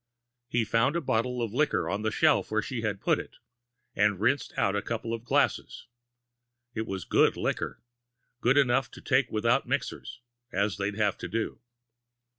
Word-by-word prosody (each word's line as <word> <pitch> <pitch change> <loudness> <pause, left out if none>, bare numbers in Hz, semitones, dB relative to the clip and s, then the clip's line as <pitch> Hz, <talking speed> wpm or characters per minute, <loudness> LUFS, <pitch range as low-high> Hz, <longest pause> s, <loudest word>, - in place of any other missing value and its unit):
He 120 -2 0
found 125 +8 +2
a - - +2
bottle 125 -3 0
of 110 -2 -4
liquor 150 +4 +1
on 100 - -2
the 110 - 0
shelf 155 +6 +3
where 110 0 0
she 125 -1 -4
had 105 -3 -2
put - - +2
it, - - -9 0.6
and 105 -2 +2
rinsed 130 +7 +1
out 100 0 +2
a 100 - 0
couple 115 +1 -3
of 115 -1 -4
glasses. 120 - 0 0.9
It 110 -1 -3
was 95 -3 -4
good - - +3
liquor - - -2 0.6
good 125 +3 +3
enough 130 -3 +3
to - - -10
take - - +2
without 115 +5 +2
mixers, 130 -2 -3 0.3
as 100 +1 0
they'd 100 0 -2
have 105 -2 0
to - - -4
do. 110 +5 -3
115 Hz, 175 wpm, -28 LUFS, 105-125 Hz, 0.9 s, shelf